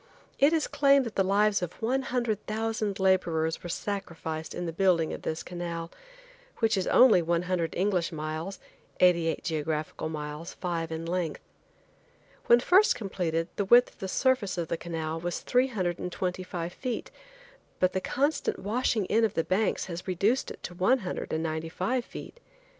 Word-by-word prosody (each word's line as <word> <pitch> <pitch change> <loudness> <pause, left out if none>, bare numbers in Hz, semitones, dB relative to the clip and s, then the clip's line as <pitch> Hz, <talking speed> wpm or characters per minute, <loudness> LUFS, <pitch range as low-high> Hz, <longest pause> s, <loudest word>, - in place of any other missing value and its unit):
It 280 +3 +6
is 320 -2 +2
claimed 275 -2 +4
that 230 - -5
the 195 - +2
lives 205 +1 +3
of 180 -1 -3
100,000 225 -4 -1
laborers 170 -4 +1
were 175 - -7
sacrificed 165 -5 -4
in 175 - -3
the 165 - -3
building 175 -3 +2
of - - -6
this 160 - -3
canal, 170 -1 -5 0.7
which 225 -2 +2
is 190 -2 -1
only 240 -8 +6
100 170 0 0
English 185 -2 +1
miles, 155 +4 -4 0.4
88 170 -3 +3
geographical 155 0 -2
miles, 150 +1 -6
5 165 -3 -3
in 160 +1 -4
length. 170 -2 -2 1.1
When 235 - +7
first 370 - +5
completed 170 -5 -2
the 200 - 0
width 240 +5 +6
of - - -28
the 190 - -4
surface 225 -3 +1
of 170 -2 -2
the - - 0
canal 165 -1 -4
was 175 +1 -3
three 250 +1 +2
hundred 185 -8 -2
and 180 - -4
twenty 180 +1 -2
five 175 -1 -5
feet, 250 -3 -4 0.7
but 185 0 +2
the 190 - -1
constant 285 +9 0
washing 215 0 0
in 225 +4 +2
of 220 - +1
the 165 - +2
banks 195 +5 0
has 175 0 -7
reduced 200 +8 +1
it - - -10
to 175 - -6
one 190 +9 +3
hundred 180 - -4
and 160 +1 -1
ninety 160 0 -3
five 220 +9 -1
feet. 485 - -10
180 Hz, 170 wpm, -28 LUFS, 165-220 Hz, 1.1 s, When